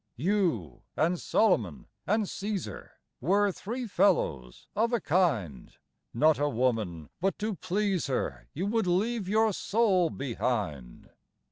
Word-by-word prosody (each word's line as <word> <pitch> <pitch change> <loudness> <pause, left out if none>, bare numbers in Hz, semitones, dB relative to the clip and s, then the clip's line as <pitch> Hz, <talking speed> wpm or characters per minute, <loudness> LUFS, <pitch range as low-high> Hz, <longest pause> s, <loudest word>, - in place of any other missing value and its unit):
You 160 - 0 0.2
and 170 +4 +2
Solomon 115 - +1 0.2
and 215 +3 +2
Cæsar 195 - -5 0.3
Were 200 +7 +2
three 240 +7 -5
fellows 80 - +1
of 230 +3 +1
a 240 - +3
kind; 125 - 0 0.4
Not 155 +6 +3
a 145 0 +2
woman 110 - -1
but 195 +2 0
to 215 +1 -2
please 190 -1 -1
her 135 - -3
You 175 +6 -3
would 220 -1 0
leave 200 +3 0
your 220 0 +3
soul 195 -5 +2
behind. 105 - -3
180 Hz, 125 wpm, -29 LUFS, -, 0.4 s, a